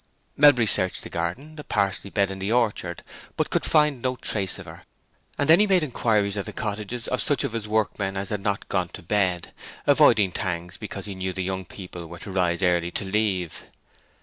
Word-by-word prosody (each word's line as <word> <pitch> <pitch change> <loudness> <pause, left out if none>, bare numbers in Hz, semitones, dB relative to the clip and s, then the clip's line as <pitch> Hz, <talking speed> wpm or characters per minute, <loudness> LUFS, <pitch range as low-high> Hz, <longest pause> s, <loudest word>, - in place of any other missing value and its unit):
Melbury 140 -5 +6
searched 95 -3 0
the - - -9
garden, 125 - -4
the 150 - -7
parsley 100 -3 -1
bed, 100 -1 +1
and 95 0 -7
the 100 +3 -1
orchard, 110 -7 0 0.3
but - - 0
could - - +1
find 150 -5 +3
no 130 0 0
trace 100 -6 -1
of - - -9
her, - - -11 0.6
and 145 - +1
then 165 +2 +7
he 210 - +5
made 185 -4 +4
inquiries 110 -7 +1
at 100 - -3
the - - -6
cottages 110 +3 -3
of 125 - 0
such 145 -1 +1
of 135 -5 -2
his 110 -2 -3
workmen 105 -2 0
as 100 0 -3
had 105 -2 -2
not 100 0 -2
gone 90 -3 0
to - - -9
bed, 90 -2 0 0.3
avoiding 100 -3 +5
Tangs's 90 +1 -3
because 105 -2 -6
he 100 - -5
knew 95 0 -3
the 95 0 -3
young 95 0 -3
people 90 -2 -9
were 85 +1 -9
to 95 - -8
rise 90 -1 +1
early 85 -1 +2
to 100 - -2
leave. 95 -4 -1
100 Hz, 210 wpm, -25 LUFS, 95-115 Hz, 0.6 s, then